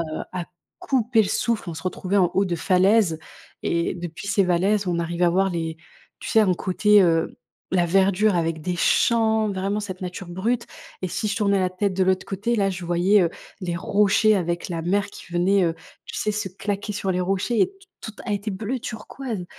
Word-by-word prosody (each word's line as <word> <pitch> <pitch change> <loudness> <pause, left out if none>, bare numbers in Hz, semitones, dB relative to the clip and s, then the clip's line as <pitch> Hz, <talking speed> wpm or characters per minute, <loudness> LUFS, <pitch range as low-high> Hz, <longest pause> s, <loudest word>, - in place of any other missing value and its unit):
heu, 155 -2 -4
à 175 -2 -4 0.3
couper 240 -4 +2
le 195 - -2
souffle. 230 -3 -1
On - - -6
se - - -8
retrouvait 185 +1 -2
en 180 -3 +4
haut 195 - +3
de 175 - -1
falaises 190 -1 +3 0.4
et 170 +1 0
depuis 175 +1 -7
ces 210 -1 +3
falaises, 190 +3 +1
on 170 -1 0
arrivait 170 +1 -1
à - - +4
voir 195 +2 +2
les 165 -2 -3 0.4
tu - - -7
sais? 220 - +5
Un 190 -4 +3
côté, 205 +3 +4
heu, 165 -2 +1 0.4
la 175 -2 +3
verdure 195 +2 +3
avec 165 -2 -1
des 180 +1 -2
champs, 220 +2 +2
vraiment 195 +2 -2
cette 190 -3 -6
nature 185 0 -6
brute 225 +7 -1 0.4
et 185 - -1
si 215 - -2
je 205 - -1
tournais 200 -3 +2
la 185 - +1
tête 185 +2 -1
de 190 - +2
l'autre 185 0 +1
côté, 205 +5 -2
là 195 -3 +2
je 180 -1 -6
voyais, 180 +4 +3
heu, 170 - +1 0.3
les 175 -2 -3
rochers 205 +3 +3
avec 175 -1 -2
la 165 - -2
mer 200 +4 +1
qui - - -13
venait, 185 +2 +3
heu, 165 -1 0 0.3
tu - - -8
sais? 210 - 0
Se 210 -2 -3
claquer 200 +2 -4
sur 195 -1 -2
les 180 0 0
rochers 195 +5 0
et - - +5
t 390 - -21 0.3
tout 220 - -6
elle 210 - -1
était 205 +1 -3
bleu 220 +7 -3
turquoise. 225 -2 -6
190 Hz, 215 wpm, -23 LUFS, 175-210 Hz, 0.4 s, sais